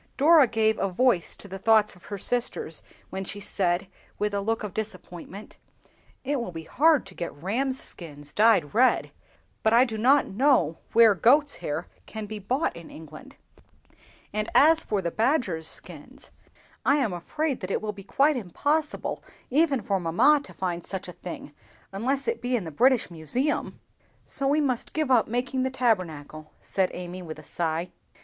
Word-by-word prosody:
Dora 300 0 +6
gave 220 -1 +1
a 195 - 0
voice 190 -2 +1
to - - -12
the 195 0 -7
thoughts 215 -1 +3
of 180 - -19
her 205 - -5
sisters 215 -7 -3 0.3
when 190 0 -4
she 200 +2 -7
said, 185 -2 0 0.3
with 210 0 -1
a 200 - 0
look 225 +2 -1
of 210 - -5
disappointment, 205 -2 -7 0.7
"It 275 -1 -1
will 235 - -5
be 165 -1 -7
hard 305 - +3
to 195 - -12
get 170 -4 -5
rams' 250 - -2
skins 145 -4 -11
dyed 210 -9 +4
red, 255 +4 +3 0.5
but 220 - +2
I 240 +2 +6
do 220 -3 -5
not 270 +5 +5
know 245 - +2
where 230 -2 +7
goats' 280 - +3
hair - - -4 0.2
can 220 -1 -6
be 215 0 -6
bought 255 +10 -1
in 170 -1 -11
England; 155 -1 -12 1.0
and 215 0 -2
as 315 +5 +6
for 205 -3 -1
the 170 - -1
badgers' 220 - 0
skins, - - -9 0.5
I 280 - +4
am 245 -10 0
afraid 280 - -2
that 185 - -6
it - - 0
will 215 -1 -4
be 195 -1 -11
quite 280 +9 +2
impossible 290 - -2 0.3
even 280 -3 +2
for 195 -2 0
mamma 225 - +4
to - - -12
find 175 -2 -3
such 190 -2 -6
a - - -8
thing, 170 -5 -9 0.4
unless 255 +8 -1
it 465 0 -1
be 250 +1 0
in 225 - -1
the 160 - -7
British 250 - +3
Museum." 240 - -2 0.5
"So 275 - -2
we 295 +3 +3
must 255 -5 -2
give 305 -4 0
up 240 -3 +4
making 245 +3 -1
the 260 - +1
Tabernacle," 165 - -2
said 190 -2 0
Amy, 180 +1 -7
with 160 -3 -8
a 155 - -12
sigh. 165 +2 -2
215 Hz, 180 wpm, -26 LUFS, 180-260 Hz, 1.0 s, where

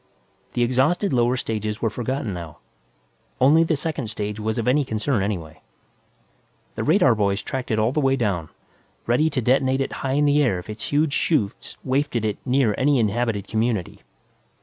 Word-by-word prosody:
The 120 - +1
exhausted 140 - +1
lower 120 +1 +2
stages 110 -2 -3
were 115 - 0
forgotten 125 -1 -3
now; 85 -4 -8 0.8
only 150 +6 +5
the 160 -1 +1
second 145 -4 -3
stage 105 0 -4
was 110 +1 -2
of 115 - -2
any 145 +4 +3
concern 115 -1 -1
anyway. 85 -6 -4 1.1
The - - -3
radar - - +4
boys 100 -2 0
tracked 130 -1 -4
it 110 - +1
all 110 +2 +2
the 150 - 0
way 135 -1 +3
down, 100 -10 -1 0.6
ready 125 +7 +2
to 140 -4 -2
detonate 130 +2 +2
it 135 - -1
high 135 -1 -1
in 145 +1 +2
the 145 +1 +4
air 120 -10 +2
if 90 +4 -7
its 105 - -6
huge 145 0 +2
'chutes 115 -12 -1
wafted 130 -3 0
it 105 - -2
near 125 -4 +2
any 140 +1 +3
inhabited 110 -2 0
community. 110 -4 -1
120 Hz, 175 wpm, -23 LUFS, 105-135 Hz, 1.1 s, only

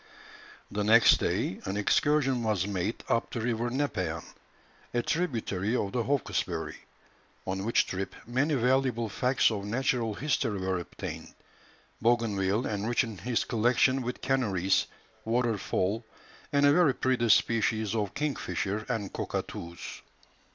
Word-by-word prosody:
The 105 +1 -1
next 115 +3 +7
day, 95 - -1
an 95 +1 -2
excursion 135 +4 +2
was 105 -5 0
made 100 +2 -2
up 115 - +1
the 120 - -4
river 115 +1 -1
Nepean, 140 +4 -2 0.7
a 120 - +2
tributary 115 - -1
of 100 -5 -1
the 120 - 0
Hawkesbury, 140 +3 -1 0.7
on 95 0 -2
which 115 - +3
trip 95 +1 -4
many 130 +6 +1
valuable 125 -2 +1
facts 125 +4 +2
of 100 -2 -3
natural 115 0 0
history 125 -7 0
were 95 -1 -1
obtained, 85 - -7 0.7
Bougainville 110 -2 +1
enriching 110 0 -1
his 120 +5 0
collection 125 +3 +2
with 125 0 -4
canaries, 100 -8 +1 0.4
waterfowl, 115 -2 0 0.5
and 145 -1 +4
a 145 - +6
very 160 -5 +4
pretty 125 -3 +1
species 110 0 +3
of 105 -4 -2
kingfisher 105 - -2
and 110 -5 -2
cockatoos. 85 0 -5
115 Hz, 125 wpm, -29 LUFS, 100-125 Hz, 0.7 s, next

